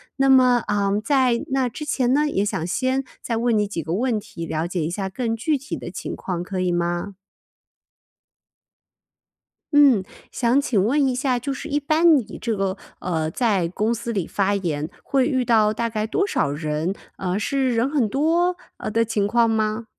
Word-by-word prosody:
那 270 0 +2
么 255 -3 +5
呃， 200 0 +1
在 260 -5 +2
那 265 -2 +1
之 300 +6 -7
前 255 -4 +1
呢， 300 +1 +2
也 200 -9 0
想 165 -5 -2
先 260 +7 0 0.2
再 230 -2 -2
问 235 0 +1
你 210 -1 +2
几 170 -5 -4
个 160 +3 -3
问 230 +1 0
题， 170 -5 -8
了 160 +1 -2
解 175 -1 -2
一 155 - -1
下 190 +2 -3
更 225 +3 -2
具 295 +7 0
体 275 +1 -5
的 - - -7
情 - - -5
况 180 -3 -4
可 185 +1 -4
以 180 -1 +1
吗？ 175 +3 -1 2.6
嗯， 275 -9 +6 0.3
想 245 +3 +2
请 225 -9 +1
问 275 +7 +2
一 260 - +1
下 250 0 0
就 275 +3 -3
是 280 - -7
一 290 0 +1
般 310 +2 +4
你 230 -5 -5
这 230 -2 -1
个， 195 -1 -1 0.2
呃， 160 -3 -1
在 200 -3 +1
公 210 +6 0
司 235 +1 -4
里 195 -6 -1
发 200 +2 0
言， 160 -5 -2
会 265 -2 +1
遇 260 -4 0
到 220 -2 +4
大 230 +2 -1
概 215 -1 -2
多 395 - +1
少 145 - 0
人？ 155 +4 -2 0.2
呃， 185 0 -2
是 260 +2 0
人 235 +3 +2
很 270 -8 +1
多， 335 - +2 0.2
呃， - - -4
的 230 +2 +1
情 210 -2 0
况 235 +2 +3
吗？ 220 +1 0
225 Hz, 205 characters per minute, -22 LUFS, 190-265 Hz, 2.6 s, 嗯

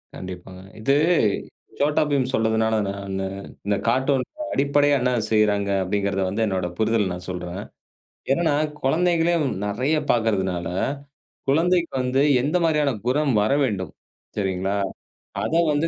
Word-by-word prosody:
கண்டிப்பாங்க. 90 0 -8 0.2
இது 135 +5 +3 0.8
சோட்டா 145 +1 +2
பீம் 130 -3 +1
சொன்னதுனால 110 -1 +2
நானு, 100 -1 -4 0.4
"இந்த 100 0 +1
கார்ட்டூன்க்கு 135 - 0
அடிப்படையா 145 +1 +3
என்ன 125 0 +2 0.2
செய்றாங்க?" 105 -2 +2
அப்படிங்கறதை 100 0 -1
வந்து 110 +4 -1
என்னோட 95 -3 -1
புரிதல் 110 -4 +1
நான் 90 0 -8
சொல்றேன். 90 +1 -5 0.7
என்னனா 160 0 +2 0.3
குழந்தைகளே 170 +3 +2 0.3
நெறைய 130 +10 0
பார்க்கறதுனால, 95 -7 +1 0.8
குழந்தைக்கு 170 +4 +2
வந்து 130 +2 +2 0.2
எந்த 150 +6 0
மாரியான 150 -3 +2 0.2
குணம் 140 +2 +2
வரவேண்டும்? 110 -6 0 0.4
சரிங்களா, 95 0 -1 0.7
அதை 165 - +1
வந்து 150 +3 +1
115 Hz, 115 wpm, -23 LUFS, 100-145 Hz, 0.8 s, இது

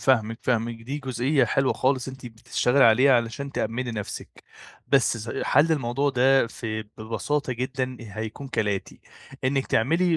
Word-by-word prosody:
فاهمِك، 115 -4 +2
فاهمِك. 115 -1 -1
دي 135 +5 -4
جزئية 130 +1 +1
حلوة 135 +3 +1
خالص 130 -1 0
أنتِ 130 -1 -9
بتشتغلي 125 +3 +1
عليها 130 +5 +6
علشان 125 +4 -1
تأمِّني 120 0 -2
نفسِك. 105 -3 -7 0.4
بس 135 -3 +3
ز 115 0 -4
حَل 150 +4 +4
الموضوع 140 0 0
ده 135 0 +4
ف 115 +1 -8 0.3
ببساطة 130 +6 -2
جدًا 130 +1 -3
هيكون 110 +4 -7
كالآتي. 105 -6 -2 0.4
إنِّك 135 0 +1
تعملي 165 +9 +2
130 Hz, 140 wpm, -25 LUFS, 115-135 Hz, 0.4 s, عليها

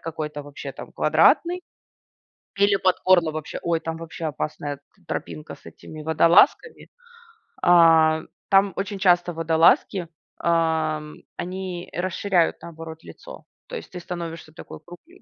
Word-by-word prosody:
какой-то 150 -2 -5
вообще, 145 0 -8
там, - - -11
квадратный. 355 +1 +3 1.0
Или 200 0 +4
под 185 -1 +2
горло 175 -4 +4
вообще. 155 -1 -6
Ой, 170 -1 0
там 165 0 -5
вообще 165 0 -7
опасная 145 -1 -4
т 140 - -35 0.2
тропинка 80 -3 -6
с - - -25
этими 155 -1 -11
водолазками. 165 - +3 0.7
А, 165 -2 +5 0.3
там, 195 0 +4
очень 200 0 -4
часто 175 -2 +3
водолазки, 165 +2 +2 0.3
а, 160 -2 +1
м, 150 0 -12
они 180 -1 -5
расширяют 180 0 0
наоборот 160 -1 -9
лицо. - - -12 0.2
То - - -7
есть - - -8
ты 180 - -7
становишься 170 -3 -7
такой - - -11
кругле 330 - -15
165 Hz, 135 wpm, -23 LUFS, 160-185 Hz, 1.0 s, А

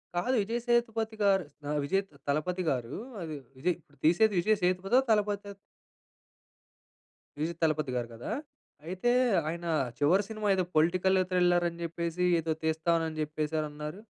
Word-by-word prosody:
కాదు 245 +10 +1
విజయ్ 230 +4 -2
సేతుపతిగారు 220 -5 +2 0.3
ఆహ్, 150 0 0
విజయ్ 195 +8 +1
త - - -24
తలపతిగారు 150 -4 -1 0.3
అది 160 -2 -5 0.2
విజయ్ 170 +6 +1
ఇప్పుడు 145 -3 -27
తీసేది 205 +7 +4
విజయ్ 215 +5 +3
సేతుపతా? 185 +7 +3
తలపతా? 205 -1 +1 1.9
విజయ్ 160 +3 -2
తలపతి 155 -3 +1
గారు 120 -1 -1
కదా! 115 +1 -6 0.6
అయితే 185 +7 0 0.4
ఆయన 170 +1 -5 0.3
చివరి 175 +8 +4
సినిమా 215 -1 -3
ఏదో 185 - +1
పొలిటికల్ 185 +4 +3
థ్రిల్లర్ 175 -1 +3
అని 170 0 -12
చెప్పేసి 170 +1 -2 0.2
ఏదో 165 0 -2
తీస్తానని 160 0 0
చెప్పేసానన్నారు. 150 +1 -3
175 Hz, 125 wpm, -30 LUFS, 155-195 Hz, 1.9 s, తీసేది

